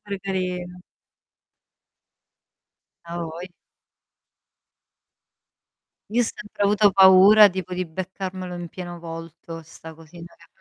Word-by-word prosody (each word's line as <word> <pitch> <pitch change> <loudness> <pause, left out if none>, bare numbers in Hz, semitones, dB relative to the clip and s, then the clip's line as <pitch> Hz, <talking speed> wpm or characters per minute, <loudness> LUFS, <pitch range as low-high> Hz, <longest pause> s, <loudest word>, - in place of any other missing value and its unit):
pare 200 -2 -6
carino. 180 -2 -4 2.2
A 170 0 -7
voi 170 +3 -8 2.6
Io 240 +2 +1
ho - - +3
sempre 215 -2 -6
avuto 205 0 +4
paura 195 +3 +7
tipo 185 -1 -6
di 185 0 -2
beccarmelo 185 +1 -6
in 175 -1 -7
pieno 175 0 -8
volto 165 0 -9
'sta 160 0 -13
cosina 165 +2 -14 0.2
che - - -35
180 Hz, 100 wpm, -23 LUFS, 170-195 Hz, 2.6 s, paura